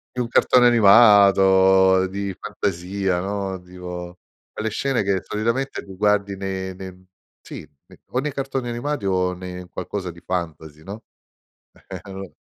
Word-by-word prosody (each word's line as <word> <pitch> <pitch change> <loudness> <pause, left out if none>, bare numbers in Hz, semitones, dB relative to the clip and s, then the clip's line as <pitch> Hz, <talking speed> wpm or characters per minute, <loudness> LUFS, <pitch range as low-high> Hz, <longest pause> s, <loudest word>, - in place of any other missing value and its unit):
È - - -4
un 120 - -1
cartone 125 +1 +4
animato 95 -4 +5
di 100 0 -5
fantasia, 95 0 -2
no, 95 0 -4
dico 90 -1 -9 0.3
quelle 110 +1 -3
scene 130 +2 -1
che 95 -2 0
solitamente 115 +6 -2
li 95 - -12
guardi 100 0 +1
ne 95 -1 -5
ne 95 0 -11 0.4
sì - - -9 0.3
ne - - -19
o - - -5
nei 145 +1 -3
cartoni 135 -2 -3
animati, 120 0 -3
o 90 -1 0
ne 90 0 -8
in 90 -1 -11
qualcosa 95 0 -5
di 85 0 -11
fantasy, 80 -4 -5
no, 100 +5 -9 0.8
e 95 - -7
allor 95 0 -9
95 Hz, 150 wpm, -22 LUFS, 90-105 Hz, 0.8 s, animato